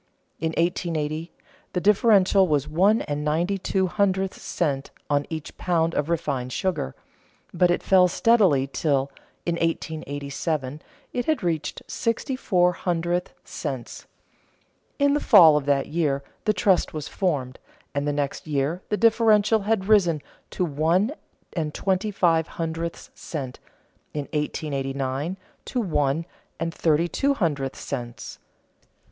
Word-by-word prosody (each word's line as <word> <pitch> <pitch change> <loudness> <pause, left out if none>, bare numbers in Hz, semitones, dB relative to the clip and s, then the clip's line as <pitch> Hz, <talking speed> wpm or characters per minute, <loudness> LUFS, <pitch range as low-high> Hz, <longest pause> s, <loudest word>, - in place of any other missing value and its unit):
In 160 - 0
1880, 165 -2 -1 0.4
the 180 - +1
differential 200 -1 +4
was 150 -3 +1
one 190 +8 +3
and 145 0 -3
ninety 170 +6 0
two 190 +1 0
hundredths 190 0 0
cents 140 -5 -2 0.2
on 145 0 +1
each 160 -2 -6
pound 165 -2 +1
of 150 - -1
refined 140 -6 -1
sugar, 170 - -2 0.6
but 180 - +3
it 175 - +1
fell 185 -1 +5
steadily 185 - +3
till, 140 -1 0 0.3
in 170 -1 0
1887, 150 -3 -3 0.3
it 245 -1 -1
had 310 -8 0
reached 160 -4 -2
sixty 230 +3 -2
four 180 -8 +2
hundredths 175 0 -2
cents. - - -6 0.9
In 285 0 +3
the 295 - +2
fall 175 - +7
of 145 -1 -1
that 140 -1 +2
year 150 -4 0 0.2
the 215 - +3
trust 185 -3 +2
was 150 -2 -4
formed; 140 -9 -2 0.3
and 140 +1 -1
the - - +2
next 145 +1 -3
year 150 +4 -1
the 210 - 0
differential 220 -1 +4
had 205 -1 0
risen 175 -8 +3 0.3
to 180 - -1
one 165 - +1 0.4
and 155 -4 -3
twenty 190 +2 0
five 165 -5 +2
hundredths 165 0 -4
cents, 135 -6 -6 0.6
in 150 - 0
1889 140 +1 -2 0.3
to 250 - -2
one 155 - 0 0.3
and 165 0 -2
thirty 165 +1 +2
two 280 +9 +1
hundredths 145 - -1
cents. 120 -3 -6
165 Hz, 135 wpm, -24 LUFS, 145-190 Hz, 0.9 s, fall